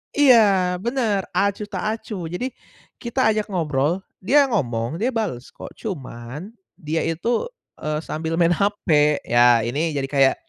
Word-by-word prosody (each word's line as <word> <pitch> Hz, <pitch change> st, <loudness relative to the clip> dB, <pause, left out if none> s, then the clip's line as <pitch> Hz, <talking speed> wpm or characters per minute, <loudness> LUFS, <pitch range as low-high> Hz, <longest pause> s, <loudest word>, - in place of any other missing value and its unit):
Iya 210 Hz, -10 st, +5 dB
bener 230 Hz, -5 st, 0 dB
acuh 200 Hz, +1 st, 0 dB
tak -, -, -3 dB
acuh 205 Hz, -6 st, -6 dB
jadi, 245 Hz, +10 st, -4 dB, 0.5 s
kita 235 Hz, -1 st, +1 dB
ajak 215 Hz, -1 st, -1 dB
ngobrol 165 Hz, -1 st, 0 dB, 0.2 s
dia 280 Hz, +9 st, +5 dB
ngomong 120 Hz, -, -1 dB
dia 235 Hz, -, +2 dB
bales 205 Hz, -, -3 dB
kok -, -, -9 dB
cuman 145 Hz, -, -7 dB, 0.2 s
dia 160 Hz, -2 st, -3 dB
itu, 225 Hz, -, -1 dB, 0.3 s
eee, 150 Hz, 0 st, -2 dB
sambil 160 Hz, +1 st, -3 dB
main 170 Hz, 0 st, +3 dB
hape 160 Hz, -6 st, +2 dB
ya 120 Hz, -1 st, +4 dB
ini 145 Hz, +6 st, -1 dB
jadi 135 Hz, -1 st, -1 dB
kayak, 135 Hz, -2 st, +4 dB
175 Hz, 145 wpm, -22 LUFS, 145-215 Hz, 0.5 s, Iya